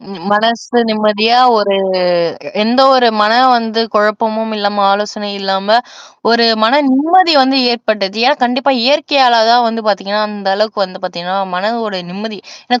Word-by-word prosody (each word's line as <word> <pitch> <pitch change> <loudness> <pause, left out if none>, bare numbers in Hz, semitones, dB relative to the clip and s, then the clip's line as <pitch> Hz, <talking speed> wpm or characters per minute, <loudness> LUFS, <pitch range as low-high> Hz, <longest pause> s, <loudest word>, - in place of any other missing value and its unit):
ம், - - -20
ம். - - -14
மனசு 225 +3 -1
நிம்மதியா 215 +2 +1 0.2
ஒரு 200 -1 0 0.9
எந்த 235 +5 +1
ஒரு 250 -2 +3
மன 210 +1 +2 0.2
வந்து 225 -1 -2
குழப்பமும் 220 +1 -1
இல்லாம 205 -1 -1
ஆலோசனையும் 205 0 -4
இல்லாம, 195 +3 +1 0.5
ஒரு 235 0 +3 0.2
மன 275 +7 +3
நிம்மதி 335 +6 +3
வந்து 265 +1 +1
ஏற்பட்டுது. 215 -4 -3
ஏன்னா 285 +3 +2
கண்டிப்பா, 270 +3 0
இயற்கையால 275 -4 +2
தான் 240 0 +3
வந்து 225 0 -5
பாத்தீங்கன்னா, 205 +1 -2
அந்த 205 -2 -7
அளவுக்கு 210 -1 -1
வந்து 185 0 -14
பாத்தீங்கன்னா, 180 +1 -5 0.2
மனதோட 210 0 -4
நிம்மதி. 205 +1 -8 0.3
ஏன்னா 245 0 0
220 Hz, 145 wpm, -13 LUFS, 205-240 Hz, 0.9 s, ஒரு